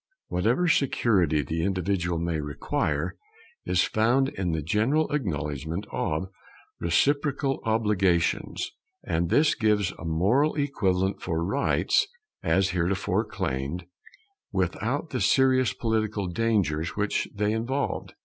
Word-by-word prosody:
Whatever 115 - +1
security 100 - +2
the 80 +4 -2
individual 90 -2 0
may 85 -1 -1
require 75 - -2 0.5
is - - +3
found 125 +5 +2
in 95 -9 -2
the 80 -2 -2
general 125 - +1
acknowledgment 80 - -2
of 80 +2 -1 0.5
reciprocal 140 - +1
obligations; 105 -6 +1 0.3
and 85 +1 -1
this 150 - +4
gives 105 -5 +1
a - - -8
moral 100 - +2
equivalent 95 -10 0
for 85 -2 -1
rights 135 +9 +2 0.3
as 95 +3 +2
hitherto 90 +2 0
claimed, 70 +7 -3 0.7
without 110 - -1
the 125 - -2
serious 130 +1 +4
political 110 -3 -1
dangers 90 -5 0
which 105 0 0
they 105 +1 +1
involved. 125 +6 -2
100 Hz, 110 wpm, -26 LUFS, 85-125 Hz, 0.7 s, this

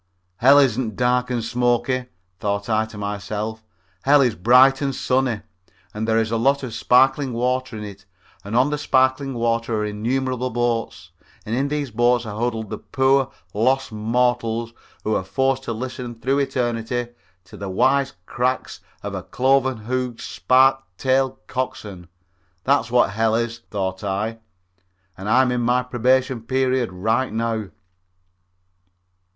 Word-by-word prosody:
"Hell 135 +6 +6
isn't 125 -5 +2
dark 125 0 +1
and 120 -2 -1
smoky," 120 +2 0 0.3
thought 100 -1 -2
I 110 -1 +1
to 110 - -11
myself; 105 +2 -4 0.4
"hell 145 +1 +5
is 125 -4 +3
bright 125 +7 +5
and 135 -2 -1
sunny, 130 -4 0 0.5
and 110 +1 -3
there 110 0 +2
is 115 0 0
lots 135 +5 +2
of 125 -4 -5
sparkling 130 +2 +3
water 125 0 -1
in 105 - -6
it 100 -1 -10 0.4
and 105 +3 -5
on 130 +4 +3
the 150 - -1
sparkling 130 0 +1
water 115 -1 0
are - - -1
innumerable 125 +4 -2
boats 120 -1 -2 0.3
and 110 - -2
in 135 +3 0
these 145 -3 -3
boats 120 +1 +2
are 105 0 -6
huddled 115 -3 -2
the - - -4
poor 135 0 +2 0.2
lost 130 +5 +1
mortals 115 +1 0 0.3
who 110 - 0
are 95 - 0
forced 135 +6 0
to - - -3
listen 125 +1 -5
through 130 +4 0
eternity 120 -3 -1 0.3
to 90 - -14
the 100 - -6
wise 135 +7 +2
cracks 130 +2 -2 0.2
of - - -6
cloven 130 -1 +2
hoofed, 125 +2 -3
spike 130 +10 +3 0.2
tailed 130 0 +1
coxswains. 110 -9 -5 0.6
That's 135 -4 +2
what 120 -3 +3
hell 110 +1 +1
is," 115 0 -2
thought 95 -1 -3
I, 105 +3 -2 0.8
"and 95 +3 -6
I 130 +4 +5
am 125 - 0
in 125 -1 0
my 125 +1 +2
probation 125 0 +1
period 130 -1 0
right 110 +8 0
now." 110 -1 -1
120 Hz, 150 wpm, -22 LUFS, 110-130 Hz, 0.8 s, Hell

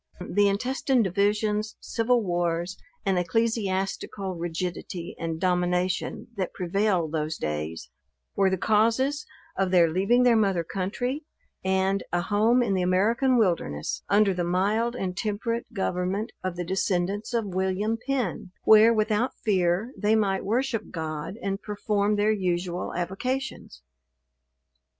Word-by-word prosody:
The 205 +1 +3
intestine 250 +4 +1
divisions, 210 +2 0
civil 235 +1 +1
wars, 175 0 -1 0.3
and 190 -2 +2
ecclesiastical 195 -1 -1
rigidity 175 0 -4
and 165 -1 -3
domination 180 0 0
that 185 -2 -3
prevailed 180 -2 0
those 155 0 -2
days, 75 -3 -4 0.4
were 195 -1 +3
the 190 - 0
causes 230 - +2 0.3
of 195 -1 +1
their 175 -2 +5
leaving 195 +9 +3
their 245 -2 +5
mother 195 -6 +2
country 230 - -3 0.4
and 190 +1 +1
a 175 - +1
home 215 +7 +3
in 210 -4 0
the 185 - +1
American 225 +8 +2
wilderness, 170 - 0
under 200 -1 +4
the 180 -1 -1
mild 205 +7 +1
and 185 -6 -3
temperate 230 +3 -2
government 190 +2 -2
of 185 -2 -2
the 175 0 -4
descendants 190 +3 -1
of 225 -6 -1
William 190 +4 0
Penn; 250 -9 -2
where 220 +1 +7
without 215 +2 +1
fear 190 +3 +1
they 215 +1 +2
might 195 -3 +1
worship 230 +1 -1
God, 160 +1 -4
and 195 0 -2
perform 210 0 0
their 210 +1 +2
usual 180 -3 -1
avocations. 190 - -4
195 Hz, 130 wpm, -26 LUFS, 180-220 Hz, 0.4 s, where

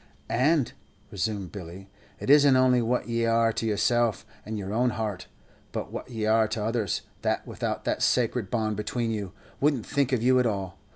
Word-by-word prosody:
"And," 140 +2 +2 0.4
resumed 100 -3 -3
Billy, 95 0 -9 0.3
"it - - +1
isn't 145 -2 +7
only 130 -1 +4
what 120 +2 0
ye 115 0 0
are 115 0 +3
to 115 - -2
yourself 115 +1 +1 0.2
and 110 0 -5
your 100 0 -4
own 125 +3 +2
heart, 110 -5 -4 0.4
but - - -4
what - - -6
ye 110 -3 -3
are 110 0 +4
to 110 0 -3
others, 110 -3 -1 0.2
that - - -1
without - - -3
that - - -1
sacret 120 -4 +1
bond 110 -3 -1
between 115 +2 -2
you, 100 -4 -3 0.3
wouldn't 140 -6 +1
think 140 -2 0
of 120 -3 +1
you 130 +1 +5
at 125 - +3
all. 95 -3 -4
115 Hz, 185 wpm, -27 LUFS, 105-125 Hz, 0.4 s, isn't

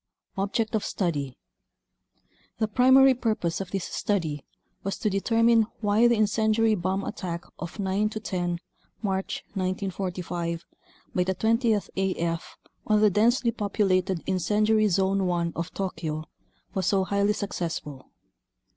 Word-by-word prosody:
Object 205 +3 -1
of 220 - +1
Study 145 -9 -2 1.2
The 220 - +1
primary 260 +4 +6
purpose 220 -8 -1
of 190 - -6
this 195 -3 -2
study 160 -8 -2 0.4
was 195 - -3
to 210 - 0
determine 225 +2 +3
why 215 +2 +4
the 240 - +4
incendiary 220 +1 +2
bomb 190 0 -1
attack 170 -3 -4 0.2
of 175 +2 -6
9 200 +1 0
10 180 -5 -2 0.5
March 190 -2 -2
1945 185 -3 -3 0.5
by 180 - +2
the 190 +1 -1
Twentieth 225 0 +1
AF 170 -3 -2 0.3
on 210 -1 +4
the 210 -1 +5
densely 235 +4 +3
populated 195 -4 0
Incendiary 210 +4 +2
Zone 195 0 +2
1 170 -1 0
of 170 +2 -3
Tokyo 160 -5 -3 0.5
was 190 -2 -1
so 195 -2 +3
highly 200 +2 +1
successful. 165 -9 -4
195 Hz, 125 wpm, -26 LUFS, 180-215 Hz, 1.2 s, primary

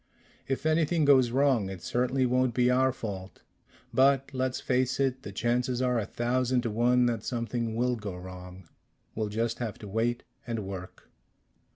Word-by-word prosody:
"If 135 +2 -2
anything 160 0 +2
goes 130 -4 +5
wrong, 130 -5 +2
it 95 -2 -8
certainly 125 +2 +1
won't 125 -1 +1
be 125 0 +3
our 130 +1 +3
fault. 95 -6 -7 0.5
But 135 +1 +3
let's 130 0 -1
face 130 +1 0
it 130 -1 0
the 105 - -7
chances 120 +4 0
are 125 -2 +1
a 105 - -3
thousand 125 +2 0
to 115 -2 -2
one 120 +3 +3
that 115 -3 -1
something 115 -2 -2
will 125 +1 +1
go 105 -5 -6
wrong. 90 0 -10 0.5
We'll 110 -1 -2
just 115 +2 -2
have 115 -4 -4
to 105 - -10
wait. 115 +4 -1 0.2
And 115 -4 -3
work." 95 -1 -8
120 Hz, 170 wpm, -28 LUFS, 110-130 Hz, 0.5 s, goes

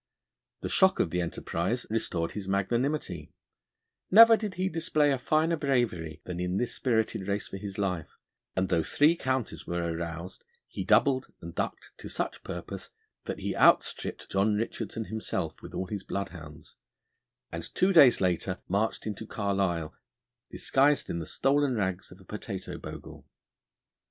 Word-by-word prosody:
The - - -3
shock 190 0 +4
of 80 - +1
the 90 - 0
enterprise 90 +6 -2
restored 85 -7 -1
his 100 -2 -6
magnanimity. 100 - -1 0.7
Never 225 +3 +9
did 210 -4 -4
he 185 +2 0
display 160 -4 +2
a 135 - 0
finer 155 +5 +2
bravery 120 - 0
than 90 -1 -5
in 90 +1 -1
this 120 +1 -1
spirited 110 -5 0
race 100 0 -1
for - - -6
his 100 -1 -7
life, 90 -6 -1 0.5
and 95 0 +1
though 85 - +3
three 150 - +3
counties 130 -6 -2
were 85 0 -1
aroused 85 +2 -6 0.2
he - - -5
doubled 135 -1 +3
and 85 0 -8
ducked - - -4
to - - -8
such - - -3
purpose - - -6 0.4
that - - -4
he - - -2
outstripped - - +2
John 100 +2 +2
Richardson 110 0 -3
himself 110 0 -3
with - - -9
all 95 - -2
his 100 +1 -5
bloodhounds, 80 -7 -6 0.8
and - - -4
two 190 +1 +3
days 140 -8 +8
later 90 0 0
marched 105 +4 0
into 110 0 -5
Carlisle 95 -7 -1 0.6
disguised 140 +2 +2
in 85 - -2
the 80 - -5
stolen 140 -1 +2
rags 95 -3 -2
of 90 - -13
a 95 - -17
potato 100 -2 -6
bogle. - - -9
100 Hz, 155 wpm, -29 LUFS, 90-135 Hz, 0.8 s, Never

